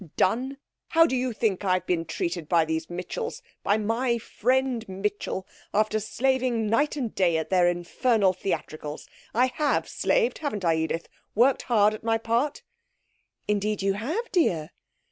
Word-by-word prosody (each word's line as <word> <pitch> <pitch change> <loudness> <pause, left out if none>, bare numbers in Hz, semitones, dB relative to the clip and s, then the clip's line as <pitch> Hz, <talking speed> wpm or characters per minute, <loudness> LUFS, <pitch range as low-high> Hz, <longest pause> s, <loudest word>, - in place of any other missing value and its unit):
'Done! 255 +8 +1 0.3
How 330 0 +5
do 290 - 0
you 255 0 0
think 215 -4 0
I've 185 -1 +1
been 170 -2 0
treated 170 0 -3
by 170 -2 +4
these 160 0 -2
Mitchells 180 - -5 0.2
by 205 - +2
my 235 +3 0
friend 255 +1 0
Mitchell 195 0 -3 0.3
after 215 +1 +2
slaving 245 +1 0
night 255 +9 +2
and 250 -7 -3
day 175 -4 +2
at 160 - -3
their 180 -2 +5
infernal 190 +4 +2
theatricals? 155 -5 -4 0.3
I 245 +2 +5
have 285 +3 0
slaved, - - +1
haven't 215 - -3
I, 165 - +4
Edith? 160 +1 -2 0.3
Worked 250 +4 +4
hard 215 -3 +4
at 215 - -8
my 225 0 +2
part?' 235 +6 -1 0.8
'Indeed 210 0 0
you 195 0 +2
have, 315 - -3
dear.' 170 - +1
215 Hz, 155 wpm, -26 LUFS, 185-255 Hz, 0.8 s, How